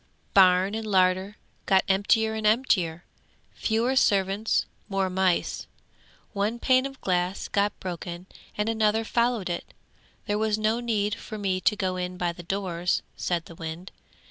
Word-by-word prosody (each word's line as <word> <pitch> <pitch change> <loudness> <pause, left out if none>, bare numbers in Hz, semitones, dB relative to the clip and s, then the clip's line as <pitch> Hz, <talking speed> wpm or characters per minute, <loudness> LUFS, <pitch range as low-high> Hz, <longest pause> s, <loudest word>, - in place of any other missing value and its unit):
'Barn 185 0 +5
and 220 0 -4
larder 190 +1 +2 0.3
got 190 -1 +4
emptier 220 +3 +2
and 220 -1 0
emptier. 185 -8 +1 0.5
Fewer 235 +4 0
servants; 200 -2 +2 0.2
more 195 -1 0
mice. 185 -1 0 0.7
One 210 +3 -1
pane 255 +2 +3
of 270 -1 -13
glass 180 +1 -1
got 205 0 0
broken 175 -1 -6 0.3
and 210 +1 0
another 220 0 +2
followed 235 -4 +1
it. 175 -1 -5 0.5
There 210 0 -1
was 215 -1 +1
no 215 +2 +1
need 215 -4 0
for 215 - -7
me 190 -2 -1
to 210 - +3
go 185 -2 -2
in 180 0 -4
by 175 -1 -1
the 175 - -10
doors,' 180 -1 -1
said 170 -2 -2
the - - -11
wind. 165 +3 -7
195 Hz, 150 wpm, -26 LUFS, 185-220 Hz, 0.7 s, Barn